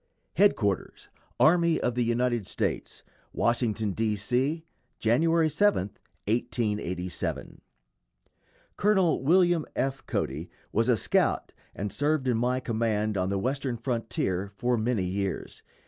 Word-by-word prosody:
] - - -47
HEADQUARTERS 105 - +1 0.3
ARMY 170 0 +4
OF 120 - 0
THE 120 0 +1
UNITED 120 -2 0
STATES, - - -3 0.3
WASHINGTON, 115 -3 0
D. 110 +1 0
C., 130 +10 -1 0.3
January 160 +8 +3
7, 155 - +2 0.4
1887. 105 -5 -2 1.2
Col. 190 -4 +3
William 175 +2 +4
F. 135 0 -1
Cody 75 +6 -2 0.2
was 115 +3 +1
a 120 - +4
scout - - +1 0.2
and 100 +1 -4
served 145 -1 0
in 125 - +2
my 125 +2 +1
command 110 -3 -1
on 95 -1 0
the 100 - 0
Western 130 +3 -2
frontier 115 -6 -2
for 120 +5 -1
many 115 -3 0
years. 95 +1 -3
120 Hz, 120 wpm, -27 LUFS, 105-135 Hz, 1.2 s, ARMY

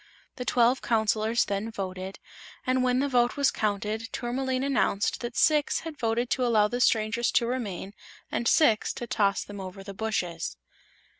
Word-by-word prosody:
The 250 - -4
twelve 245 +1 +3
Counselors 220 0 +1
then 200 +2 -2
voted, 190 -2 -5 0.5
and 255 -1 +2
when 250 0 +2
the 285 - +1
vote 245 -2 +2
was 280 -1 +3
counted 215 +2 -2
Tourmaline 260 +2 -2
announced 265 -7 +1
that 240 -1 -5
six 300 -2 +3
had 320 -2 -8
voted 235 +1 0
to 255 - +1
allow 220 -4 +4
the 245 +3 -3
strangers 225 0 +2
to 235 - +3
remain 210 -6 -4 0.4
and 235 - -1
six 230 -8 +4
to 240 - -5
toss 200 -3 +1
them 205 -1 -8
over 190 +1 -8
the 200 0 -8
bushes. 180 -6 -3
230 Hz, 165 wpm, -27 LUFS, 205-250 Hz, 0.5 s, allow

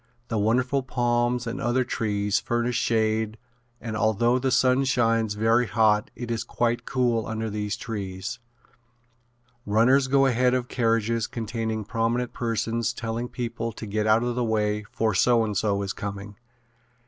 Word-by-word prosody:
The 110 - 0
wonderful 125 +6 +1
palms 120 -1 0
and 120 +4 -4
other 125 0 +1
trees 105 -4 0
furnish 120 +1 -1
shade 110 -1 0 0.4
and 110 -2 -5
although 110 +4 +2
the 130 +1 0
sun 130 +1 +3
shines 115 -4 +1
very 115 +3 +2
hot 110 -2 +2
it 120 -1 -5
is 115 -1 -1
quite 120 0 -1
cool 120 -4 +1
under 110 -1 -3
these 105 0 -3
trees. 100 +1 -5 1.2
Runners 120 +6 +3
go 135 +1 +4
ahead 125 0 +3
of 125 -1 -1
carriages 115 -2 0
containing 110 -2 -3
prominent 115 +2 -1
persons 115 0 -1
telling 115 +1 -4
people 115 -1 -4
to 110 - -8
get 105 +1 -1
out 110 +2 +4
of 120 0 -1
the 125 0 -1
way 105 -2 0
for 110 -2 0
so 115 +4 +4
and 105 -2 -3
so 100 0 0
is 100 - -3
coming. 100 0 -6
115 Hz, 155 wpm, -25 LUFS, 110-120 Hz, 1.2 s, go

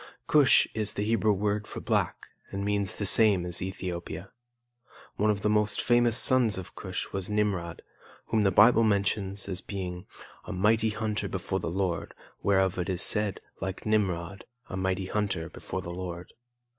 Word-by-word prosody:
Cush 145 -3 +5
is 105 -1 -1
the 100 - -2
Hebrew 110 0 +2
word 105 +1 -1
for - - -6
black - - -1 0.2
and 100 +1 -4
means 100 -2 0
the 100 - -3
same 100 -3 +5
as 90 -1 -3
Ethiopia. 90 0 -5 0.9
One 105 +1 +2
of 100 -2 0
the 105 - +1
most 105 0 +1
famous 120 -1 +3
sons 120 -7 +3
of 95 -1 -8
Cush 95 -2 -5
was 95 0 -3
Nimrod, 100 -5 -1 0.4
whom 110 - +1
the 100 - +4
Bible 110 +5 +6
mentions 100 -1 0
as 95 -2 -3
being 90 -2 -6 0.4
"a - - -6
mighty 110 +4 +2
hunter 110 0 -2
before - - -3
the - - -3
Lord; 90 -1 -2 0.3
whereof 95 -2 +2
it 90 - -2
is 90 -2 -1
said, 105 -3 +2 0.2
like 95 0 -5
Nimrod, 95 -4 -1 0.3
a - - -5
mighty 95 0 -1
hunter 95 -5 -2
before 95 - -6
the 85 - -6
Lord." 90 -1 -7
100 Hz, 170 wpm, -28 LUFS, 95-105 Hz, 0.9 s, Bible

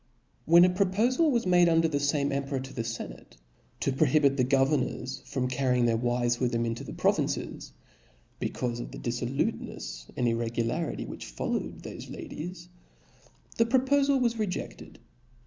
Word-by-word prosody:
When 170 +2 +7
a - - +4
propofal 215 - +2
was 240 -6 +1
made 175 -1 +5
under 165 0 +4
the 145 -3 -1
fame 145 0 +1
em 140 0 -1
peror 135 -2 -3
to 135 - -9
the 115 - -2
ienare, 115 - -7 0.4
to 140 - +1
prohibit 140 0 +3
the 130 - +2
governors 135 0 +1
from 130 -3 -1
carrying 125 -1 +1
their 115 -1 +3
wives 120 +1 0
with 125 -2 +1
them 115 -1 0
into 115 0 -3
the - - -8
provinces, - - -1 0.7
becaufe 120 -1 -2
of - - -5
the - - -9
diflblutenefs 120 - -3
and 125 - +1
irregularity 115 +7 -1
which - - -8
followed - - -3
thofe - - -8
ladies, 175 +2 -7 0.9
the 230 - +4
propofal 275 +2 +3
was 235 -2 +1
rejeded. 180 - -4
135 Hz, 155 wpm, -28 LUFS, 120-175 Hz, 0.9 s, When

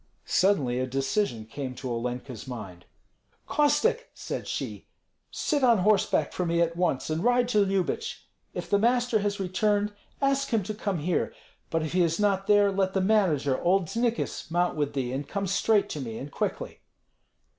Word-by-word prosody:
Suddenly 145 -11 +2
a 130 - -1
decision 135 - -1
came 130 +2 -6
to 130 - -6
Olenka's 125 0 -4
mind. 100 -8 -8 0.6
"Kostek!" 455 +12 +2
said - - -5
she, - - -5 0.4
"sit 290 -3 -1
on 235 -3 +6
horseback 200 +2 +2
for 180 - -1
me 170 -1 0
at 170 0 +1
once, 170 -5 0
and 160 +3 -1
ride 245 0 +3
to 210 -4 +4
Lyubich. 195 -2 -2 0.3
If - - -4
the 200 - +2
master 240 0 +2
has 205 0 -1
returned, 205 +2 +1 0.3
ask 275 0 +1
him 225 -4 +1
to 215 +4 -4
come 205 -3 -2
here; 175 +3 -1 0.3
but 165 -1 0
if 155 - -4
he 180 - +3
is 165 +1 +1
not 195 -2 +1
there, 205 -1 +5
let 190 -1 0
the - - +3
manager, 180 -10 +2
old 185 +1 +3
Znikis, 235 0 -1
mount 175 +1 +1
with 145 -2 -1
thee 130 -2 -2
and 140 +2 -3
come 200 0 -2
straight 200 +2 +2
to 150 - -4
me, 115 -3 -5
and 140 +4 -7
quickly." - - -3
185 Hz, 175 wpm, -27 LUFS, 140-210 Hz, 0.6 s, on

